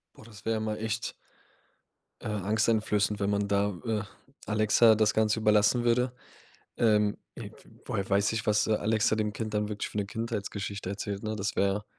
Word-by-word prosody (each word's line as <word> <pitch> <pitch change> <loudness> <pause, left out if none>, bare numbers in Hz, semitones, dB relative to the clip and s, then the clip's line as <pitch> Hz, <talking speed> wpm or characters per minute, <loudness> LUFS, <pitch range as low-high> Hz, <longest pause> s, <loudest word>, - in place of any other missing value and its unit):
Boah, - - -15
das 105 -3 -14
wär 115 -1 0
mal 110 0 -2
echt 110 +1 -3 1.1
äh, - - -6
angsteinflößend, 105 0 +1
wenn 100 0 0
man 100 0 0
da, 100 0 +1
äh, 110 -3 0 0.4
Alexa 110 +1 +5
das 105 -1 +2
Ganze 110 0 +2
überlassen 105 +2 +3
würde. 125 +1 +2 0.6
Ähm, 105 -2 +3 0.2
w - - -8 0.3
woher 95 -1 -3
weiß 100 +1 +3
ich, 115 - -2
was, 105 0 +3
äh, 110 - +2
Alexa 110 +1 +1
dem 105 -1 -1
Kind 110 0 -4
dann 105 0 0
wirklich 105 -1 -4
für - - -7
eine 100 - 0
Kindheitsgeschichte 100 -3 -4
erzählt, 100 0 -4
ne? 110 0 -2
Das 100 -1 -3
wäre 100 +1 +1
105 Hz, 175 wpm, -29 LUFS, 100-110 Hz, 1.1 s, Alexa